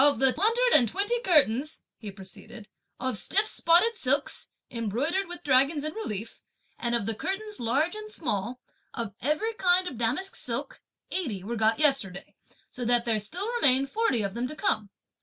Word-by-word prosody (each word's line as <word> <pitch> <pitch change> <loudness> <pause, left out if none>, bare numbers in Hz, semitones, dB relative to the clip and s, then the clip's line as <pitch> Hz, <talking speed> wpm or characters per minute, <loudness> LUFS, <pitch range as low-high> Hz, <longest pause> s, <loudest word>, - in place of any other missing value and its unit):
"Of 285 -4 +5
the 265 +2 +4
hundred 460 +7 +2
and 240 -4 +1
twenty 410 - 0
curtains," 300 - +2
he 215 - -8
proceeded, 195 +3 -10 0.3
"of 260 -3 -2
stiff - - +2
spotted 420 +4 +3
silks, 280 +2 0 0.2
embroidered 255 - -1
with 350 0 -7
dragons 280 +2 +3
in 310 0 -3
relief, 225 - -6 0.4
and 235 -1 0
of 230 -4 -1
the 225 - -1
curtains 410 - -4
large 275 - +1
and 430 0 -7
small, 250 - -2 0.4
of 230 -5 -4
every 305 - 0
kind 365 -3 +2
of 260 -9 -6
damask 265 +12 0
silk, - - -1 0.3
eighty 245 - -2
were 235 +4 -4
got 220 0 +2
yesterday, 270 -11 +1 0.4
so 245 - -6
that 240 0 +2
there 225 -2 +1
still 345 - -3
remain 265 0 +5
forty 275 - 0
of 195 -1 -3
them 240 +3 -2
to 305 - -8
come. 215 -9 -1
270 Hz, 175 wpm, -27 LUFS, 230-360 Hz, 0.4 s, Of